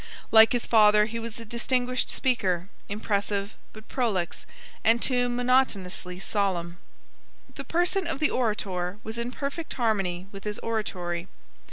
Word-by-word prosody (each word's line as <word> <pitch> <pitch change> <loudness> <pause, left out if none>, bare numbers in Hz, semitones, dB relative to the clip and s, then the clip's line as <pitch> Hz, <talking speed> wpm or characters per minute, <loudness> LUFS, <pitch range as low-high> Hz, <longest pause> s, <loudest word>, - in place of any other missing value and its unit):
Like 220 +1 +8
his 245 - 0
father 210 -2 +6
he 230 +1 -4
was 230 0 -5
a 230 - -8
distinguished 245 +2 0
speaker, 190 -8 0 0.2
impressive, 200 -1 -1 0.2
but 215 0 -13
prolix, 210 -9 -1 0.4
and 225 +2 +4
too 245 -1 +1
monotonously 240 -8 0
solemn. 180 -4 -1 0.7
The - - -7
person 350 +2 +1
of 320 -4 -3
the 305 - +2
orator 200 -6 -1
was 220 +2 -5
in 235 +1 -3
perfect 280 +5 -4
harmony 195 -7 0
with 195 -2 -9
his 210 -1 -3
oratory. 180 -6 -2
220 Hz, 140 wpm, -27 LUFS, 195-245 Hz, 0.7 s, Like